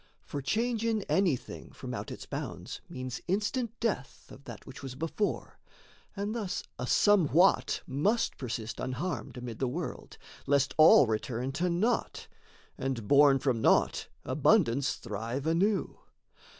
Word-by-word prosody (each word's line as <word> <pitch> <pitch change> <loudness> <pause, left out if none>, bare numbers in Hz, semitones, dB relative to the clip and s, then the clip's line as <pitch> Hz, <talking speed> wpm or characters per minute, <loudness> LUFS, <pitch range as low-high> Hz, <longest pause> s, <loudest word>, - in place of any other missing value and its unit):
For 145 - -5
change 225 - 0
in 225 -3 0
anything 180 -11 -1
from - - -7
out - - -5
its - - -8
bounds - - -6
Means 130 0 -6
instant 220 +5 -1
death 205 - -3
of 140 - -13
that - - -10
which 135 - -10
was 135 -2 -7
before; 165 +8 -3 0.6
And 205 +1 -3
thus 215 -6 -3 0.2
a 125 - -3
somewhat 175 -7 +4
must 195 - 0
persist 115 -3 -4
unharmed 130 +3 -4
Amid 120 -2 -7
the 130 - 0
world, 160 +8 -5 0.3
lest 140 -1 +2
all 155 -3 +8
return 115 +3 -2
to 175 +6 -1
naught, 200 +8 -1 0.5
And, 125 -6 -3
born 140 +1 +6
from 130 -4 0
naught, - - +3 0.2
abundance 135 - +2
thrive 115 +5 -5
anew. 190 +6 +1
145 Hz, 135 wpm, -30 LUFS, 130-200 Hz, 0.6 s, all